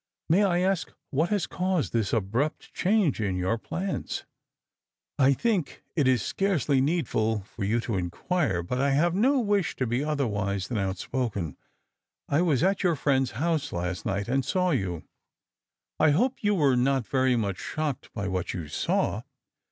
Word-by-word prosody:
" - - -51
May 190 +5 +5
I 180 -3 +2
aak 190 -1 0 0.2
wliat 160 +6 +2
lias 205 -3 +1
caused 180 - -1
this 110 -4 +1
abrupt 115 +8 -1
change 185 - +2
in 100 -3 0
your 95 +5 0
plans? 185 - -3 0.3
" - - -64
" - - -43
I 135 0 +6
think 195 - -1
it 145 -5 +2
is 125 -4 +3
scarcely 155 -9 +1
needful 115 - 0
for 100 +2 -8
you 110 +4 +1
to 115 -4 -2
inquire. 95 - -1
But 125 +9 -2
I 140 0 +2
have 165 +5 +3
no 260 +9 +3
wish 205 - +1
to 130 - -1
be 120 +4 0
otherwise 105 -10 -1
than 115 -4 -1
outspoken. 95 - -2 0.7
I 145 +4 +2
was 160 -5 +2
at 190 +1 +2
your 175 -3 +2
friend'a 135 -3 +1
house 155 +1 0
last 90 +1 -3
night, 100 0 -2
and 135 +2 +1
saw 180 +5 +1
you." 95 - -1 0.5
" - - -61
I 155 - +5
hope 240 - +1
you 205 0 +3
were 140 -7 +3
not 130 0 +2
very 130 0 +2
much 100 -5 -1
shocked 150 -4 -3
by 100 -2 -3
what 95 -2 -2
you 80 -5 -5
saw." - - 0
135 Hz, 180 wpm, -27 LUFS, 105-175 Hz, 0.7 s, I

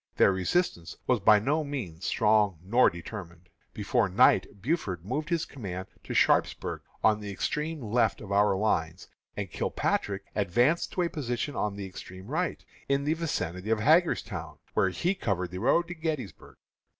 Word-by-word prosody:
Their - - +6
resistance 95 - -1
was 125 -2 +2
by 105 +2 +6
no 145 +9 +1
means 110 - -5
strong 105 -4 +3
nor 115 +7 +4
determined. 85 -1 -9 0.2
Before 105 +1 0
night 100 -1 +3
Buford 95 - -2
moved 150 +8 -3
his 165 -2 0
command 95 -7 -7
to - - -5
Sharpsburg, - - +2 0.2
on 110 -1 +4
the 105 -1 -6
extreme 150 +8 -2
left 115 0 +1
of 100 - -9
our 100 0 +4
lines, 90 -5 -1 0.3
and - - -4
Kilpatrick 100 -1 -1
advanced 120 - +2
to 180 - +1
a 170 - 0
position 135 -1 -3
on 105 -1 -1
the 100 -1 -5
extreme 95 0 -10
right, 160 - -2 0.2
in 140 0 +2
the 150 +2 +1
vicinity 95 - -3
of 110 -1 +2
Hagerstown, 160 +7 +2 0.2
where 95 - +3
he 175 - 0
covered 90 - -2
the 90 - -5
road 155 - +3
to 175 - -5
Gettysburg. 160 - -5
110 Hz, 160 wpm, -28 LUFS, 95-150 Hz, 0.3 s, Their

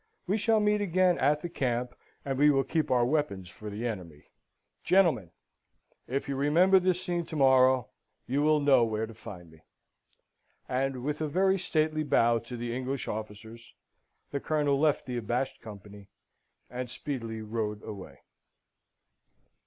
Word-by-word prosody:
We 190 +3 0
shall 220 +1 +2
meet 210 0 +2
again 185 -2 +2
at 150 +3 +2
the - - -2
camp, 125 -6 -2 0.3
and 135 -1 -1
will 145 -2 +4
keep 160 0 -1
our 125 -2 +3
weapons 120 - -1
for 105 +4 -9
the 105 +4 -5
enemy. 90 -10 -6 0.5
Gentlemen! 165 - +3 0.8
if 135 +2 -2
you 140 - -2
remember 170 +8 +4
this 180 -1 +1
scene 175 -1 -1
to - - -7
morrow, 130 -2 +4 0.4
you 135 +3 0
will 155 0 +3
know 140 -4 +4
where 110 -1 -1
to 115 - -11
find 95 -7 -11
me." 80 -1 -19 1.1
And 130 0 -2
with 150 +2 -3
a 155 - 0
very 190 +5 +2
stately 155 -3 0
bow 120 -5 +3
to 120 +2 -8
the 120 0 -4
English 130 +1 -3
officers, 110 +2 -8 0.6
the 140 - -2
Colonel 145 -2 0
left 150 -1 +2
the 125 -1 -4
abashed 120 +4 -2
company, 100 -2 -11 0.6
and 125 0 -5
speedily 115 -4 -5
rode 105 -1 -3
away. 95 -10 -9
130 Hz, 155 wpm, -29 LUFS, 115-155 Hz, 1.1 s, will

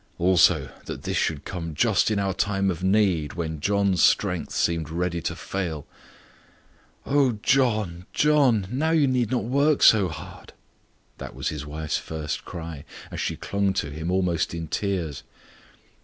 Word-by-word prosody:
Also, 90 0 +3
that - - -7
this - - -2
should 75 -3 -1
come 85 -4 -5
just - - +2
in 110 - 0
our 100 -1 0
time 95 0 0
of 90 0 -6
need 95 -6 +2
when 80 -3 -4
John's 100 +1 +1
strength - - +2
seemed 85 -2 0
ready 85 +1 -2
to - - -3
fail. 85 -7 -4 1.2
"Oh 140 -3 +3
John 110 -10 +1
John! 140 -9 +3
now 145 +6 0
you 160 -3 +4
need 125 -4 +1
not 125 -4 0
work 140 +6 +2
so 105 -4 +6
hard!" 80 -2 -10 0.7
That - - -8
was - - -2
his 75 -2 -6
wife's 75 +1 -3
first 80 -2 -5
cry, 80 -4 -7 0.3
as - - -4
she - - -2
clung 100 -1 -1
to 75 -5 -2
him 80 +3 -5
almost 90 -3 0
in 85 -1 -5
tears. 90 -8 -2
95 Hz, 155 wpm, -25 LUFS, 80-110 Hz, 1.2 s, so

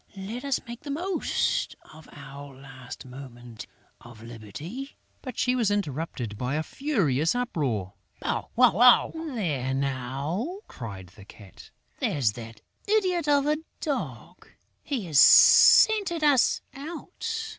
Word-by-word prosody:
Let 215 +7 -6
us 280 -2 0
make 235 0 -8
the 290 - -10
most 345 +6 -1 0.2
of 155 0 -15
our 140 0 -11
last 130 -2 -11
moment 120 -4 -11 0.3
of 120 -2 -14
liberty...." 120 - -9 0.2
But 255 - -8
she 250 - +1
was 235 -5 +1
interrupted 150 - -3
by 125 +3 -2
a 155 - -1
furious 165 - 0
uproar: 135 - -2 0.3
"Bow, - - -3
wow, - - +6
wow!" 240 +7 +5
"There 180 - -3
now!" 140 - -3
cried 100 -6 -9
the 100 +3 -16
Cat. 100 -3 -15 0.3
"There's 130 -8 +1
that 115 0 -11 0.3
idiot 370 -6 +1
of 285 -1 +3
a 300 +1 +1 0.2
Dog! 290 -3 -5 0.3
He 260 -9 -4
has 155 -5 +3
scented 395 - +7
us 285 -4 +3
out! 445 +10 -6
160 Hz, 130 wpm, -26 LUFS, -, 0.3 s, scented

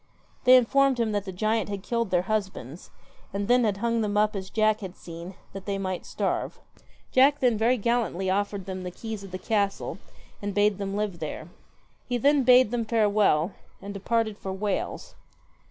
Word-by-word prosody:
They 255 +1 +9
informed 270 +1 +3
him 225 -2 +1
that 205 -1 -1
the 190 - -5
giant 215 +3 0
had 200 -2 -5
killed 235 -2 -1
their 180 -1 +2
husbands, 190 - -4 0.4
and 200 +1 -3
then 245 0 +4
had 205 -3 +1
hung 230 +2 0
them 205 -1 -1
up 210 0 +2
as 190 -1 -5
Jack 215 -1 +2
had 190 -2 -7
seen, 170 +2 -9 0.2
that 195 0 -8
they 200 -1 -1
might 185 -2 -4
starve. - - -2 0.5
Jack 280 +3 +5
then 245 -3 +3
very 230 +4 +2
gallantly 225 -5 0
offered 200 0 -1
them 190 -1 -5
the 180 - -4
keys 220 +2 -7
of 195 - -9
the 185 - -5
castle 200 0 -1 0.4
and 205 -1 -4
bade 205 -1 +3
them 195 0 -3
live 205 -4 -2
there. 155 +1 -6 0.6
He 245 - 0
then 285 +4 +4
bade 250 -2 +6
them 240 -1 0
farewell, 205 -6 +2 0.3
and 200 0 -7
departed 215 +1 -1
for 190 - -5
Wales. 195 +1 -3
205 Hz, 185 wpm, -26 LUFS, 190-230 Hz, 0.6 s, They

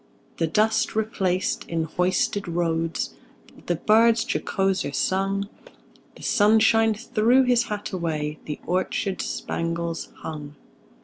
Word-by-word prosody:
The 165 - +1
dust 215 +6 +1
replaced 195 -4 0
in 165 -1 0
hoisted 185 +4 0
roads, 165 -1 -1 0.5
The 175 - +1
birds 225 +6 +4
jocoser 195 -7 -1
sung; 195 +3 0 0.7
The - - -13
sunshine 220 +1 +4
threw 240 +3 +3
his 245 -2 +3
hat 210 -1 -5
away, 155 -4 -3
The 150 - -5
orchards 185 +2 -1
spangles 170 0 -3
hung. 150 -2 -7
190 Hz, 110 wpm, -24 LUFS, 165-215 Hz, 0.7 s, birds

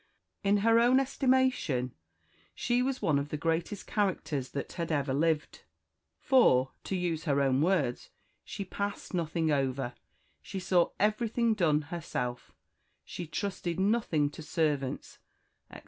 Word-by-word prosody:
In 200 +1 +3
her 230 0 +6
own 245 +3 +5
estimation 260 - +1 0.6
she 240 +1 +1
was 260 +1 -2
one 145 -3 +3
of 140 +1 -4
the 150 - -3
greatest 165 +6 -2
characters 165 -10 -1
that 140 - -5
had 170 -2 -3
ever 140 -3 0
lived; 155 +1 0 0.6
for, 135 - +4
to 195 - -2
use 175 -3 -2
her 140 -3 +2
own 135 -1 +2
words, 155 -8 0 0.3
she 200 - -6
passed 200 +2 -4
nothing 165 -2 0
over 135 -3 0 0.5
she 195 - -6
saw 180 -2 +2
everything 225 +2 +2
done 160 -7 +2
herself 125 -7 -4 0.5
she 175 - -6
trusted 185 -1 -3
nothing 190 -8 +1
to 155 - -10
servants, 150 -4 -2 0.5
etc. - - -10
165 Hz, 135 wpm, -30 LUFS, 145-205 Hz, 0.6 s, her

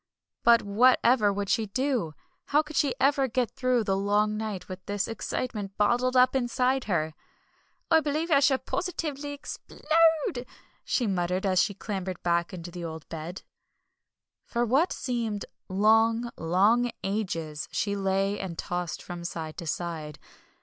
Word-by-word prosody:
But 235 -1 +6
whatever 230 +1 +4
would 200 0 -3
she 220 +1 +1
do? 240 - -1 0.3
How 300 +2 +3
could 305 0 -10
she 275 -1 +2
ever 275 0 +3
get 245 -1 0
through 255 -2 +1
the 195 -2 0
long 205 +2 +1
night 215 -3 -4
with 185 -1 -7
all - - -46
this 205 -1 -1
excitement 215 -3 -4
bottled 245 +5 +2
up 255 +1 +5
inside 255 +1 +1
her? 160 -6 0 0.8
"I 325 - +7
believe 310 +2 -2
I 280 - +6
shall 275 -1 +4
positively 300 -4 -3
explode!" 310 -2 0 0.4
she 245 - 0
muttered, 185 -1 0
as 185 -2 +3
she 200 - 0
clambered 190 -3 -5
back 170 0 +1
into 175 -1 -7
the 175 0 -7
old 160 -1 -7
bed. 165 +3 -6 1.0
For 240 +1 -1
what 275 +10 +2
seemed 230 -5 -2 0.2
long, 225 +4 +3
long 205 +9 +3
ages 170 -7 -3
she 200 -1 -1
lay 195 +1 0
and 180 -4 -5
tossed 175 -2 -3
from 175 -1 -7
side 160 -2 -5
to 170 - -6
side. 155 -3 -4
210 Hz, 150 wpm, -27 LUFS, 185-255 Hz, 1.0 s, I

